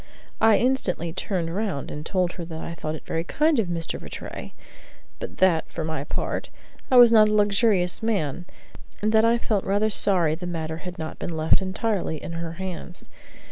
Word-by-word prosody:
I 220 -2 +6
instantly 185 -10 +1
turned 175 -2 -2
round 200 -9 -2
and 150 - -6
told 180 0 0
her 175 -2 -7
that 160 -1 -7
I 170 - -5
thought 155 -1 -4
it - - -11
very 165 - -2
kind 300 - +2
of 210 - +1
Mr. 170 -2 -3
Rattray, - - -8 0.7
but - - -7
that, 180 -4 +3
for 165 - -4
my 155 -3 -3
part, - - -3 0.4
I 255 - +5
was 240 -1 +9
not 215 -2 +6
a 215 - +1
luxurious 205 -3 +2
man, 180 -8 -1 0.6
and 215 - +2
that 220 0 +5
I 230 +1 +4
felt 215 -4 -1
rather 205 +2 +1
sorry 175 -7 +4
the 175 +3 -5
matter 160 -2 -4
had 180 +1 -8
not 160 -1 -6
been 165 -2 -4
left 160 +4 +3
entirely 190 -4 -2
in - - -7
her 165 -1 -4
hands. 185 -1 -7
180 Hz, 190 wpm, -24 LUFS, 165-215 Hz, 0.7 s, was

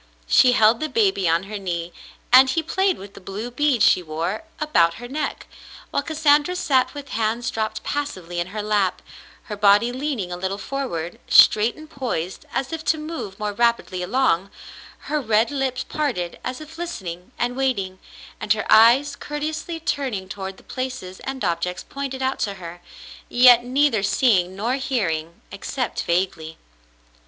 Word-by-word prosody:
She 250 - +5
held 225 0 +4
the 310 - -2
baby 385 - +2
on 165 +2 +2
her 205 +1 -6
knee, 175 -2 -4 0.4
and 260 +1 +8
he 325 +5 0
played 380 +3 +1
with 200 +1 -11
the - - -12
blue 205 +6 -6
beads 275 -2 +2
she - - +4
wore 170 - -4
about 175 - +3
her 245 - -8
neck, 295 +5 -4 0.5
while - - +1
Cas 315 +1 -6
sandra 300 +3 +4
sat 265 -7 +1
with 285 -1 -8
hands 225 +2 -1
dropped 220 0 -3
passively 185 -13 -4
in 175 - -2
her 210 +3 -5
lap, 205 -3 0 0.4
her 210 - -6
body 205 +3 +4
leaning 255 -8 -3
a 175 - -4
little 190 +2 -3
forward, 195 -8 -4
straight 220 +2 +6
and 310 0 -12
poised 235 - -4
as 270 +4 -3
if 320 -1 -4
to 320 - +2
move 305 -11 -6
more 210 -1 -3
rapidly 235 -5 0
along, 195 -2 +1 0.5
her 300 +1 -2
red 220 +1 +2
lips 265 -2 -1
parted 245 - -3
as 255 0 -4
if 315 +2 -11
listening 185 - -6
and 245 +1 -1
waiting, 200 -9 -1 0.4
and 210 - +2
her 215 - -4
eyes 245 +6 +6
courteously 310 +3 -4
turning 260 -11 -2
toward 190 0 -6
the - - -18
places 255 -8 -6
and 265 -5 -3
objects 180 +1 -2
pointed 270 -1 -5
out 265 +1 -1
to 200 -1 -2
her, 175 -1 -9 0.5
yet 245 -1 +7
neither 255 -3 +2
seeing 195 -3 +2
nor 235 +7 -1
hearing, 170 - -2
except 250 +5 -3
vaguely. 170 -2 -1
235 Hz, 165 wpm, -22 LUFS, 190-275 Hz, 0.5 s, and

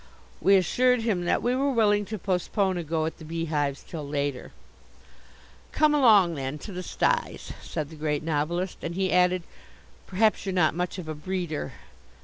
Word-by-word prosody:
We 195 - +5
assured 245 +6 +3
him 195 -6 0
that - - +1
we 245 +1 +1
were 275 +2 +1
willing 210 -4 +3
to 215 +2 -5
postpone 190 0 0
a - - -3
go 160 0 -1
at 160 - -5
the - - -10
beehives 155 -3 -2
till 165 - -6
later. 140 -2 -3 1.2
"Come 305 -1 +3
along, 215 - +5
then, 135 -1 -4
to 200 - -9
the 180 -1 -5
styes," - - -1
said 150 0 -5
the - - -10
Great 150 -1 -2
Novelist, 165 +4 -1
and 170 +1 -4
he 190 0 0
added, 180 0 +3 0.6
"Perhaps 215 +3 +2
you're 190 - -1
not 170 -4 +3
much 180 +2 -3
of 180 -4 -7
a 155 - -3
breeder." 155 -3 -4
180 Hz, 175 wpm, -26 LUFS, 155-200 Hz, 1.2 s, We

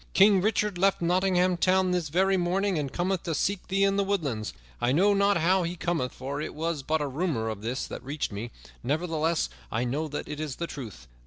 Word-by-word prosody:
King 195 -1 +6
Richard 210 -2 0
left 195 +1 +3
Nottingham 180 0 +2
Town 185 +1 +3
this 175 -4 0
very 190 +5 +3
morning, 185 0 +1
and 140 -3 -3
cometh 180 0 -1
to 165 - -2
seek 200 +5 -1
thee 195 +1 +1
in 195 0 +3
the 200 - +3
woodlands. 150 - -1 0.3
I 120 - +2
know 195 +9 +4
not 200 0 +3
how 185 +3 +3
he 170 0 -2
cometh, 165 -7 -1
for 140 +3 -5
it - - -5
was 160 -1 -2
but 155 +3 0
a - - -1
rumor 135 -6 -1
of 110 -2 -5
this 120 +4 -2
that - - -7
reached 145 +1 -3
me; 105 +4 -5 0.3
nevertheless, 160 +2 0 0.2
I 115 - 0
know 140 +6 -1
that 150 0 -5
it 150 0 -6
is 150 -4 -3
the 170 - -3
truth. 115 - -8
170 Hz, 220 wpm, -27 LUFS, 145-190 Hz, 0.3 s, King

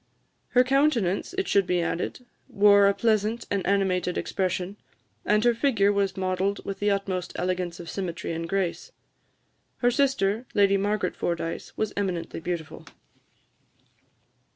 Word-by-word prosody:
Her 250 - +8
countenance, 265 - +1
it 385 - 0
should 200 -2 +2
be 180 - +1
added, 175 +8 -3 0.2
wore 200 0 +6
a 200 - +4
pleasant 220 0 +1
and 200 -2 0
animated 185 -3 +1
expression, 185 +1 -2 0.5
and 210 +1 +3
her 240 0 +4
figure 225 -5 +2
was 200 -1 0
modelled 190 +1 -1
with 195 - -5
the 205 - +1
utmost 190 -3 -2
elegance 180 -1 -2
of 170 - -8
symmetry 175 -3 -4
and 165 0 -4
grace. 195 - -2 0.9
Her 245 0 +2
sister, 245 -4 +1
Lady 200 -1 +4
Margaret 200 -1 0
Fordyce, 170 -1 -4
was 215 -1 -1
eminently 180 -6 -3
beautiful. 165 -2 -5
195 Hz, 135 wpm, -26 LUFS, 180-210 Hz, 0.9 s, Her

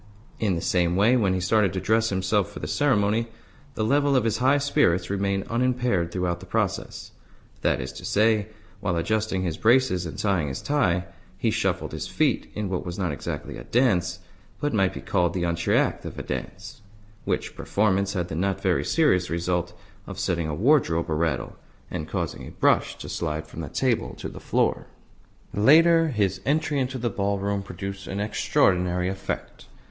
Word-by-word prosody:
In 100 -5 +1
the 85 - -3
same 85 -1 +1
way, 105 +6 +4
when 100 -6 +2
he - - 0
started 100 +1 +2
to 95 - -1
dress 110 +3 +2
himself 95 +1 0
for - - -11
the - - -5
ceremony, 115 -5 +1 0.5
the 110 - -1
level 140 +4 +3
of 130 - +3
his 115 -1 0
high 135 +3 +4
spirits 115 - +2
remained 100 0 -1
unimpaired 120 -7 0
throughout 90 -1 -1
the 95 - -12
process. 95 -1 -2 0.5
That - - +1
is 65 +1 -5
to 65 - -10
say, 105 0 +2 0.3
while 100 -4 -1
adjusting 100 +2 0
his 85 -3 -2
braces 115 -7 +3
and 80 - -8
tying 95 -7 +1
his 65 -1 -4
tie, 90 -12 +1 0.3
he - - +1
shuffled - - -1
his - - -5
feet - - 0
in 105 -1 -2
what 90 -1 -2
was 90 0 -6
not 90 -5 -1
exactly 70 - -5
a - - -8
dance, 90 -8 +1 0.4
but 145 0 -1
might 95 -3 +2
be - - -6
called 90 -3 0
the 90 - -1
entr'acte 85 0 +1
of - - -7
a - - -4
dance: 105 +5 -6 0.4
which - - -2
performance 100 -1 +1
had 90 -3 -1
the - - -7
not 95 +3 0
very 95 -3 +1
serious 90 - +2
result 85 +1 -1 0.4
of 100 - -7
setting 90 -4 -1
a 75 - -2
wardrobe 90 - +2
a - - +2
rattle, 80 +1 -1 0.4
and 80 - -4
causing 85 -5 -3
a - - -7
brush - - +1
to - - -8
slide 80 -1 -3
from - - -10
the 75 - -6
table 125 - 0
to - - -6
the - - -10
floor. - - 0 0.7
Later, 165 +9 +6
his 100 - 0
entry 150 0 +1
into 130 0 -1
the 120 -2 -2
ballroom 100 0 -1
produced 95 0 -7
an 95 - -4
extraordinary 90 -3 +1
effect. 95 +1 -5
100 Hz, 185 wpm, -25 LUFS, 90-115 Hz, 0.7 s, Later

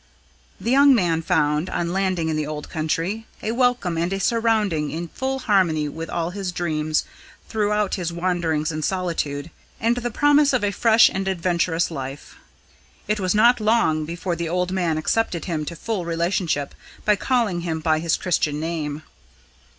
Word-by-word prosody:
The 235 - -2
young 280 0 +6
man 170 -6 +1
found, 155 -1 +1
on 170 0 -2
landing 185 -4 0
in 160 - 0
the 155 -1 -2
old 150 -1 -6
country, 165 +7 -2 0.2
a 220 - -1
welcome 240 -8 +1
and 170 +2 -1
a 195 - -1
surrounding 215 -8 +1
in 170 +1 -5
full 265 +6 -2
harmony 185 - +2
with 160 +2 -6
all 170 0 -2
his 190 -1 -4
dreams 155 -3 -1 0.4
throughout 210 -2 0
his 170 -1 -2
wanderings 170 -3 -1
and 155 0 -4
solitude, 165 -4 -2 0.3
and 235 +2 +1
the 240 0 -2
promise 290 +3 +4
of 250 - +1
a 205 - +1
fresh 230 +3 +5
and 195 0 -3
adventurous 175 -2 0
life. 135 -1 -7 0.7
It 210 +1 0
was 185 0 0
not 235 +3 +5
long 215 -8 +2
before 170 +2 -3
the 170 0 -3
old 180 +1 0
man 175 -4 0
accepted 170 +1 0
him 155 -4 -2
to 170 - -6
full 205 +2 -3
relationship 170 -3 -1 0.3
by 210 - +4
calling 215 -6 0
him 165 -2 -2
by 155 -1 +1
his 165 0 +1
Christian 150 -4 0
name. 155 -2 -3
175 Hz, 170 wpm, -23 LUFS, 160-210 Hz, 0.7 s, young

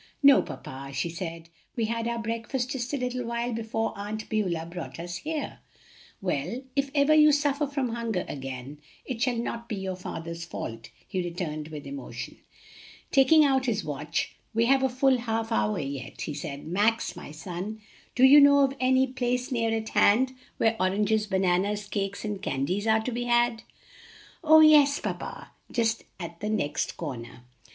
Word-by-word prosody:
"No, 280 -1 +8
papa," 135 +1 -8
she 170 - -1
said, 165 -1 -6 0.3
"we 230 -3 0
had 230 +1 -2
our 235 0 -1
breakfast 230 +3 -3
just 250 -2 -3
a 290 - 0
little 250 -1 -2
while 235 +1 -2
before 225 0 -2
Aunt 210 +2 -5
Beulah 180 -7 0
brought 170 0 -7
us 175 +1 -5
here." 310 - -4 0.6
"Well, 180 - -2
if 275 0 +1
ever 285 +1 +5
you 305 0 +7
suffer 290 0 +1
from 275 -3 -1
hunger 230 -5 -2
again 135 +1 -6 0.3
it 245 -4 -5
shall 250 -2 +1
not 235 0 -4
be 215 - -2
your 190 -1 -3
father's 170 -2 -6
fault," 115 -9 -6 0.2
he 185 - -2
returned 170 -3 -4
with 150 -2 -8
emotion. 280 0 -7 0.7
Taking 295 +3 +6
out 265 -2 +2
his 220 -3 0
watch, 150 +2 -3 0.2
"We 230 +1 +3
have 270 +2 +4
a 265 - +2
full 260 0 +3
half 225 -1 -2
hour 105 0 +1
yet," 140 -1 -5
he 150 - -3
said. 145 -1 -6
"Max, 205 +7 +1
my - - -9
son, 180 +7 -6 0.4
do 255 - +3
you 285 +3 +9
know 285 0 +7
of 270 -1 +3
any 260 +1 +4
place 250 -1 -2
near 230 -2 +1
at 220 -1 -2
hand 255 +5 +4 0.2
where 225 0 +2
oranges, 210 +3 +1
bananas, 190 +2 +1
cakes, 200 0 -3
and 205 -2 -3
candies 185 +6 -1
are 220 0 +4
to 250 - -3
be 245 +1 -2
had?" 240 -1 +2 0.8
"Oh, 315 0 +8
yes, 295 -2 +7
papa! - - -5 0.2
just 230 -2 0
at 170 -1 -7
the 210 - -3
next 150 -9 -1
corner." 125 -6 -7
225 Hz, 175 wpm, -27 LUFS, 175-255 Hz, 0.8 s, you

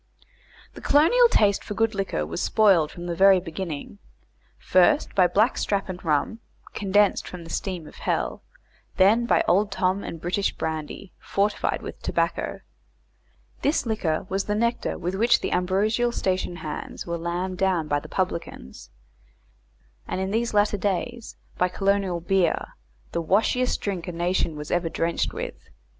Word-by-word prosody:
The - - -11
colonial 475 +13 +5
taste 200 - +3
for 210 - -6
good 225 +1 +1
liquor 195 - -2
was 80 +2 -4
spoiled 195 -8 +4
from 175 +2 -9
the 175 - -2
very 190 +1 +6
beginning, 180 - -6 0.6
first 185 +12 +3
by 185 -2 +5
black 215 +8 +2
strap 195 -1 -1
and 185 -1 -6
rum, 155 +8 0 0.3
condensed 205 0 +2
from 180 -2 -8
the 165 - -10
steam 180 -5 -3
of - - -13
hell, - - -2 0.6
then 220 +5 +4
by - - +3
Old 200 +3 +3
Tom 190 +1 0
and 165 - -6
British 180 +4 -1
brandy, 160 +4 -5
fortified 205 +1 -1
with - - -8
tobacco - - -1 1.0
this 285 0 +1
liquor 180 -9 -1
was 195 +1 -2
the 210 - -1
nectar 235 +2 -1
with 180 +2 -3
which 230 +5 +3
the - - -2
ambrosial 210 +6 +1
station 185 -5 -1
hands 155 -3 -6
were 170 0 -3
lambed 175 +2 -3
down 185 -5 +1
by 145 -1 +1
the - - -12
publicans 170 - -4 1.2
and - - -3
in 190 +1 -2
these 230 +2 0
latter 205 0 +2
days 215 +5 -3 0.2
by 180 - +4
colonial 195 -1 0
beer, 175 0 +1 0.4
the 170 - -1
washiest 225 +8 +1
drink 190 -4 -3
a - - -3
nation 170 -1 -1
was 150 0 -7
ever 175 -1 +1
drenched 165 +1 -1
with. - - -7
190 Hz, 155 wpm, -25 LUFS, 170-210 Hz, 1.2 s, very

